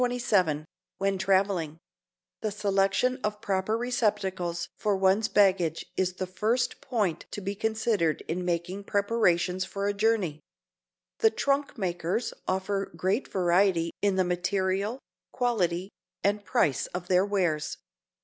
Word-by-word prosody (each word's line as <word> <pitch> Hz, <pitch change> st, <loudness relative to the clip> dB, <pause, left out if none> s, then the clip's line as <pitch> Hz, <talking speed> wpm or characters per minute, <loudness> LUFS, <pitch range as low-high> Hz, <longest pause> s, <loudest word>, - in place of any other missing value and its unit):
CHAPTER 245 Hz, 0 st, +1 dB
XXVII 180 Hz, -10 st, +2 dB, 0.3 s
WHEN 195 Hz, 0 st, 0 dB
TRAVELING 190 Hz, -5 st, +1 dB, 0.6 s
THE 215 Hz, -, 0 dB
selection 200 Hz, +5 st, +1 dB
of 210 Hz, 0 st, -1 dB
proper 195 Hz, +2 st, 0 dB
receptacles 190 Hz, -8 st, -1 dB
for 205 Hz, -2 st, 0 dB
one's 190 Hz, +3 st, +3 dB
baggage 185 Hz, -5 st, +2 dB
is 185 Hz, -1 st, 0 dB
the 185 Hz, +1 st, -3 dB
first 215 Hz, +7 st, -1 dB
point 210 Hz, -, -1 dB
to -, -, -5 dB
be 200 Hz, 0 st, -3 dB
considered 215 Hz, -6 st, 0 dB
in 180 Hz, +3 st, -3 dB
making 180 Hz, +3 st, -2 dB
preparations 185 Hz, -4 st, +1 dB
for 200 Hz, +1 st, -4 dB
a 205 Hz, -, +1 dB
journey. 205 Hz, -7 st, +1 dB, 0.8 s
The 445 Hz, -, +6 dB
trunk 280 Hz, -6 st, 0 dB
makers 180 Hz, +2 st, -1 dB
offer 190 Hz, +1 st, -1 dB
great 195 Hz, +8 st, 0 dB
variety 175 Hz, -2 st, +2 dB
in 200 Hz, -2 st, +2 dB
the 190 Hz, -, +3 dB
material, 190 Hz, +5 st, 0 dB, 0.3 s
quality 190 Hz, -7 st, 0 dB, 0.3 s
and 205 Hz, +1 st, +1 dB
price 200 Hz, -, +1 dB
of 180 Hz, 0 st, -6 dB
their 185 Hz, 0 st, +4 dB
wares. 185 Hz, -7 st, 0 dB
195 Hz, 130 wpm, -28 LUFS, 180-210 Hz, 0.8 s, The